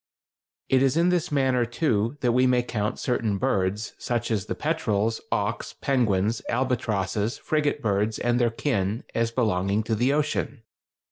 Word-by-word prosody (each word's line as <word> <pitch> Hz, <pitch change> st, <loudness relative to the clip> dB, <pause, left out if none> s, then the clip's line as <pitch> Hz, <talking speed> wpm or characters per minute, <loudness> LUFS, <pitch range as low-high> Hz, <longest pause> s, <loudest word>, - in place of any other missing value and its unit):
It 130 Hz, -1 st, +3 dB
is 135 Hz, +2 st, +2 dB
in 170 Hz, +2 st, +4 dB
this 180 Hz, -2 st, 0 dB
manner, 130 Hz, -3 st, +2 dB
too, 120 Hz, -1 st, 0 dB
that 125 Hz, -, +2 dB
we 125 Hz, +2 st, +3 dB
may 125 Hz, -1 st, +3 dB
count 105 Hz, -3 st, -2 dB
certain 110 Hz, -5 st, 0 dB
birds, 95 Hz, +3 st, -1 dB
such 120 Hz, -1 st, -2 dB
as 105 Hz, -4 st, -1 dB
the -, -, -2 dB
petrels, 110 Hz, +2 st, 0 dB
auks, -, -, -1 dB
penguins, 110 Hz, -5 st, +1 dB
albatrosses, 115 Hz, -4 st, -1 dB
frigate 150 Hz, -2 st, -1 dB
birds, 105 Hz, +1 st, +1 dB
and 120 Hz, 0 st, +1 dB
their 120 Hz, -1 st, +3 dB
kin, 110 Hz, -3 st, -1 dB
as 115 Hz, 0 st, +1 dB
belonging 105 Hz, -3 st, 0 dB
to 115 Hz, +1 st, -2 dB
the 120 Hz, +5 st, +2 dB
ocean. 145 Hz, -4 st, -1 dB
115 Hz, 155 wpm, -25 LUFS, 105-130 Hz, -, in